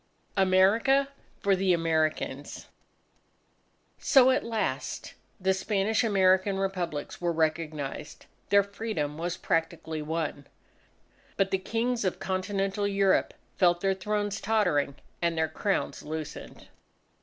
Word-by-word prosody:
AMERICA 205 +9 +4 0.3
FOR 200 -1 +3
THE 190 -1 +2
AMERICANS 155 -4 -1 1.3
So 260 -2 +6
at 260 - +1
last, 215 - -3 0.3
the 190 0 +2
Spanish 205 +3 0
American 190 -2 +3
Republics 180 -7 -3
were 175 -1 +1
recognized. 155 -3 -2 0.2
Their 200 0 +5
Freedom 200 -8 -4
was 175 +1 -2
practically 165 -1 -2
won. 155 -2 -3 0.9
But 195 -1 +1
the 190 - +1
Kings 230 +4 -1
of 185 - 0
Continental 195 +1 -1
Europe 195 -1 +2 0.2
felt 175 -2 +3
their 195 0 +2
thrones 205 +1 -2
tottering 180 -10 +1 0.3
and 170 -1 0
their 160 0 +2
crowns 200 +4 -2
loosened. 155 0 -7
190 Hz, 110 wpm, -28 LUFS, 165-200 Hz, 1.3 s, So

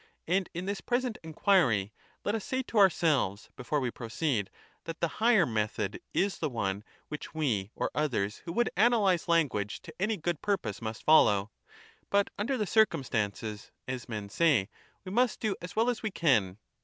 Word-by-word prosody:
And 185 +2 +1
in 175 +2 -3
this 200 +1 -3
present 245 -2 -1
enquiry, 150 - +2 0.3
let 205 - +1
us 220 -3 -2
say 260 +4 -2
to 230 -3 0
ourselves, 155 - +3
before 135 +4 -1
we 125 -3 -1
proceed, 115 -2 -2 0.4
that 165 -1 -6
the 170 - +1
higher 225 -5 +5
method 110 -2 -2
is 200 0 0
the 155 - -1
one 100 -4 -2 0.3
which 150 +1 -7
we 115 -11 0
or - - -2
others 115 -9 -1
who 170 - -7
would 240 +4 +1
analyse 205 -4 +3
language 140 - +1
to 160 - -10
any 215 +2 +1
good 170 -2 -2
purpose 190 - -2
must 110 0 -5
follow; 105 -10 +5 0.6
but 200 0 +2
under 255 +6 0
the 215 - 0
circumstances, 110 - 0 0.2
as 130 -2 -5
men 105 -3 -4
say, 130 -7 +2 0.4
wx 185 - -6
must 245 +1 +2
do 215 -3 -1
as 180 +1 -8
well 225 +2 +2
as 245 -2 0
we 220 - -1
can. 110 - +2
160 Hz, 175 wpm, -30 LUFS, -, 0.6 s, higher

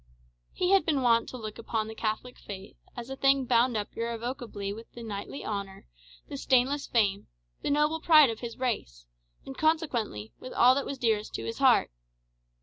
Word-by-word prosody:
He 365 +1 0
had 390 -1 +5
been 290 -5 0
wont 230 -1 +3
to 255 - -7
look 215 -2 -7
upon 225 -1 -2
the 220 - -7
Catholic 220 +3 -3
faith 195 -1 -9 0.2
as 240 +2 -7
a - - -3
thing 270 0 +3
bound 240 -1 +3
up 205 - -5
irrevocably 230 -3 -4
with 225 +2 -11
the 235 - -9
knightly 210 +5 -6
honour, 200 -2 -5 0.4
the - - -6
stainless 265 - +2
fame, 200 -4 +1 0.3
the - - -2
noble 300 +2 +2
pride 310 -6 +6
of 225 - -7
his 235 -2 -7
race, - - -3 0.4
and, 270 - -8
consequently, 265 - -1
with 255 - -8
all 250 +1 +6
that 280 +1 -2
was 275 - -4
dearest 220 -4 0
to 115 - -4
his 115 - -5
heart. - - +4
235 Hz, 185 wpm, -28 LUFS, 215-270 Hz, 0.4 s, pride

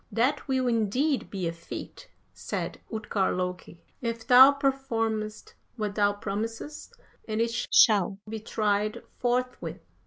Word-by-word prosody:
"'That 250 +7 +1
will 260 -2 +1
indeed 245 +6 +1
be 190 -4 -3
a - - -1
feat,' 170 - -9 0.2
said - - -4
Utgard 210 -3 -1
Loki, 180 -2 -5 0.2
'if 230 -2 -3
thou 255 +3 +9
performest 230 -6 -2 0.2
what 210 -3 -3
thou 205 -1 +3
promisest, 225 - -5 0.4
and 215 0 -2
it 230 0 +1 0.2
shall 200 -4 +5
be 220 +1 -5
tried 210 -1 -1 0.2
forthwith.' 250 +1 -2
225 Hz, 125 wpm, -27 LUFS, 205-250 Hz, 0.4 s, thou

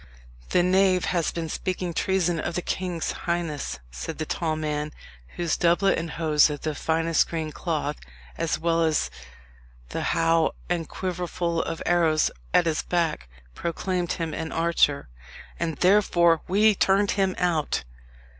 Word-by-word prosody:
"The 175 - +3
knave 185 0 +3
has 170 -3 0
been 165 -1 -4
speaking 180 +2 -3
treason 175 -2 +1
of 160 - -3
the 180 - -2
king's 180 -3 -2
highness," 165 - -3
said 110 - -6
the 155 - -3
tall 160 0 -1
man, 150 -1 -2 0.4
whose 170 -2 0
doublet 175 +3 +3
and 165 0 -4
hose 155 -1 +3
of 145 -1 -5
the 155 - -2
finest 165 +2 +1
green 160 -2 -3
cloth, 135 - -2 0.4
as 165 -1 -1
well 165 0 +1
as 160 -2 +1 0.8
the - - -3
how 165 -1 +2
and 170 -3 -2
quiverful 175 -2 -2
of 165 0 -4
arrows 165 -3 +3 0.2
at 175 - +4
his 160 -2 0
back, 165 - -1 0.2
proclaimed 175 - -2
him 165 -3 -3
an 160 +1 -4
archer 165 -4 +2 0.5
"and 165 -3 -2
therefore 175 -4 +4
we 210 +3 +4
turned 200 +1 +3
him 195 -2 +1
out!" 170 -4 0
170 Hz, 145 wpm, -25 LUFS, 160-180 Hz, 0.8 s, at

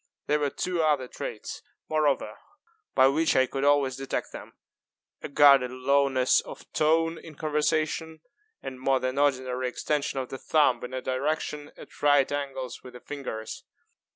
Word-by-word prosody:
There 150 - +1
were 145 -1 +1
two 175 +3 -2
other 150 -5 +1
traits, - - -7 0.3
moreover, 155 -3 0 0.6
by 130 0 +6
which 155 +4 +2
I 130 - +5
could 135 +2 -4
always 140 -2 +3
detect 135 0 -4
them; - - -10 0.7
a - - -6
guarded 140 -3 +6
lowness 130 0 +2
of - - -11
tone 165 +2 +2
in 160 -2 -12
conversation, 155 +1 -1 0.4
and 130 - -6
a - - -15
more 135 0 +2
than 130 +2 -2
ordinary 130 -3 +1
extension 145 +2 -2
of 130 - -4
the 135 - -7
thumb 145 -6 +2
in 125 - -6
a 130 - -4
direction 145 +2 -2
at - - -14
right 145 -2 +4
angles 135 -3 -4
with 125 - -12
the 125 - -10
fingers. 125 -7 -6
140 Hz, 160 wpm, -27 LUFS, 130-150 Hz, 0.7 s, by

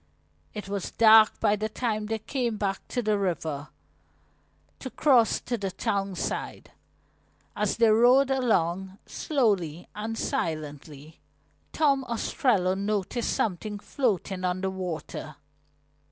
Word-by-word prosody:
It 210 -2 -6
was 200 -2 -3
dark 220 -1 +6
by 210 -2 +3
the 215 +1 -3
time 215 -2 -2
they 225 +1 -1
came 235 0 -2
back 195 -2 -2
to 245 - -2
the 210 -1 +1
river, 160 -6 -2 1.1
to 260 - -6
cross 250 -5 +3
to 240 -2 -3
the 195 -1 -2
town 195 +1 -2
side. - - -4 0.8
As 210 -1 -1
they 230 0 +5
rowed 250 +5 +5
along, 190 -7 0
slowly 195 - -1
and 220 +2 -4
silently, 150 -3 -4 0.5
Tom 280 -3 +2
Ostrello 220 -5 +1
noticed 200 +3 -2
something 210 +1 -2
floating 200 - -2
on 180 0 -1
the 190 0 -1
water. 180 -4 -6
210 Hz, 125 wpm, -27 LUFS, 185-230 Hz, 1.1 s, dark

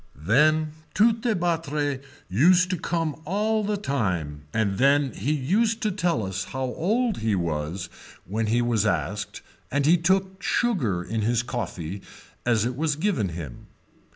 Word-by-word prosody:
Then 150 - +3 0.2
Tourtebattre 170 - +1 0.3
used 180 - +4
to 185 - 0
come 165 -3 -2
all 215 +5 0
the 210 0 0
time 90 - -2
and 100 -3 0
then 140 0 +4
he 115 +8 -2
used 205 - +1
to 215 - +1
tell 175 - 0
us 95 +1 -3
how 130 0 -4
old 205 - 0
he 110 -2 0
was 85 +1 -2 0.4
when 110 +4 -2
he 120 +3 +2
was 120 -4 +2
asked 90 +6 -2 0.3
and 140 +1 0
he 170 +4 +6
took 190 +2 +1
sugar 125 - +1
in 110 +5 -2
his 115 +2 +1
coffee 100 -7 -4 0.5
as 115 -2 +3
it 125 +1 -2
was 150 +1 0
given 155 - 0
to 85 - -7
him. 75 -7 -8
140 Hz, 155 wpm, -25 LUFS, -, 0.5 s, he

